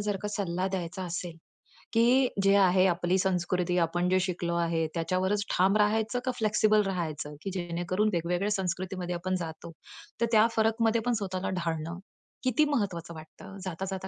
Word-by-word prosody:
जर 205 -1 -1
का 210 - -2
सल्ला 190 -3 -2
द्यायचा 185 -1 -4
असेल, 175 -1 -5 0.6
की 245 +3 +4 0.2
जे 195 0 +5
आहे 185 -1 +5
आपली 175 +1 +1
संस्कृती, 180 -1 0
आपण 175 +2 +1
जे 185 0 +3
शिकलो 180 -2 -2
आहे 165 -1 +1
त्याच्यावरच 185 +4 0
ठाम 190 +3 +4
राहायचं 220 +3 +1
का, 255 - +1
फ्लेक्सिबल 215 -1 +3
राहायचं, 160 -6 -3
की 195 - -4
जेणेकरून 175 +3 -1
वेगवेगळ्या 175 +4 0
संस्कृतीमध्ये 185 -2 -2
आपण 185 +2 -2
जातो, 165 0 -7 0.5
तर - - +5
त्या 220 0 +6
फरकमध्ये 225 +1 +2
पण 245 - +2
स्वतःला 185 -1 -3
ढाळणं, 165 +1 -3 0.4
किती 255 +4 +3
महत्वाचं 180 -7 -2
वाटतं? 160 +4 -11
जाता 185 0 -4
जाता 190 0 -4
185 Hz, 160 wpm, -28 LUFS, 175-205 Hz, 0.6 s, त्या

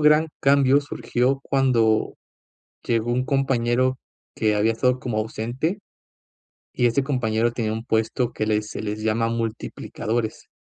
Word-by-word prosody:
gran 150 +1 +5
cambio 140 0 +4
surgió 135 -1 -1
cuando 120 -5 +2 0.7
llegó 115 0 0
un 125 +1 0
compañero 130 -2 +1 0.4
que 110 -1 +1
había 110 +2 +3
estado 125 +2 +1
como 120 -4 -3
ausente. 120 - -2 0.9
Y 125 - +1
este 130 +4 +1
compañero 120 -4 0
tenía 110 -3 -1
un 110 +1 -4
puesto 115 +2 0
que 110 - -2
les 105 0 0
se - - -5
les 105 +1 -4
llama 115 +1 +1
multiplicadores. 115 0 -3
120 Hz, 135 wpm, -23 LUFS, 110-130 Hz, 0.9 s, gran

